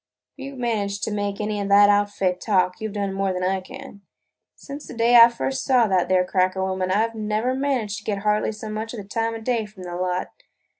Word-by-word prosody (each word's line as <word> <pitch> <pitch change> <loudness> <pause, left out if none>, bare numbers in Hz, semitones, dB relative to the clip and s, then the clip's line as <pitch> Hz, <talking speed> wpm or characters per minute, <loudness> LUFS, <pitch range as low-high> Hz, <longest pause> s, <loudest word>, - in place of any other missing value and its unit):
"If 275 - -10
you 275 0 -7
've - - -12
managed 210 -5 -2
to - - -1
make 205 -1 -3
any 210 -1 -2
of 200 - -3
that 205 +1 +7
outfit 205 -3 +1
talk, 185 -1 +1
you 220 - -3
've - - -10
done 200 -2 -2
more 195 0 -1
than 180 0 -3
I 190 +1 0
can. 200 +2 -11 0.5
Since 285 +1 -9
the - - -9
day 235 +1 +3
I 235 0 +10
first 260 +3 -3
saw 255 -3 +4
that 185 -3 +1
there 185 -1 +3
cracker 185 0 0
woman, 185 -1 -2
I 210 +4 +2
've 230 - -13
never 215 +3 -1
managed 260 -6 -1
to - - -18
get 200 -2 -3
hardly 210 0 +1
so 215 0 -8
much 220 +2 -5
as - - -6
the 195 - -9
time 225 +2 -2
o' 225 - -7
day 230 -2 -1
from 205 -3 -13
the 175 -1 -6
lot. 180 0 -2
210 Hz, 250 wpm, -23 LUFS, 195-230 Hz, 0.5 s, I